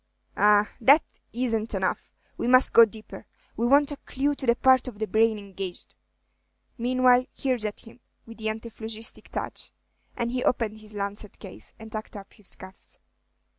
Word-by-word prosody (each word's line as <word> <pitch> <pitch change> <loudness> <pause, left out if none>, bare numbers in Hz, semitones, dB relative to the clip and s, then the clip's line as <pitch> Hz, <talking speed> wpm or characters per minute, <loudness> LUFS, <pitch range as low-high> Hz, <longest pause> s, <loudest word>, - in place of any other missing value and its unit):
"Ah, 210 0 +4
that 280 +7 +6 0.3
isn't 225 -3 -1
enough, 190 -1 -2 0.2
we - - -3
must 255 +1 +6
go 230 - +9
'deeper; 220 0 -12 0.3
we 235 - 0
want 285 +3 +4
a 290 - -5
clew 280 +2 -1
to 270 -2 -5
the 235 - +5
part 260 0 +4
of 235 -5 -7
the 215 - -1
brain 220 0 +2
engaged. 195 -3 -7 0.8
Meanwhile, 250 +1 +3
here's 255 -5 -1
at 210 - -4
him, 230 +1 -16 0.3
with 230 0 -13
the 220 0 -2
antiphlogistic 220 0 -5
touch;" - - -5 0.5
and 235 0 -1
he 250 0 -2
opened 220 -3 0
his 215 0 -7
lancet 200 +1 -4
case, 195 -3 -11
and 220 -1 -11
tucked 215 -1 -6
up 195 -1 -12
his 210 -4 -7
cuffs. 190 0 -14
225 Hz, 170 wpm, -26 LUFS, 210-250 Hz, 0.8 s, go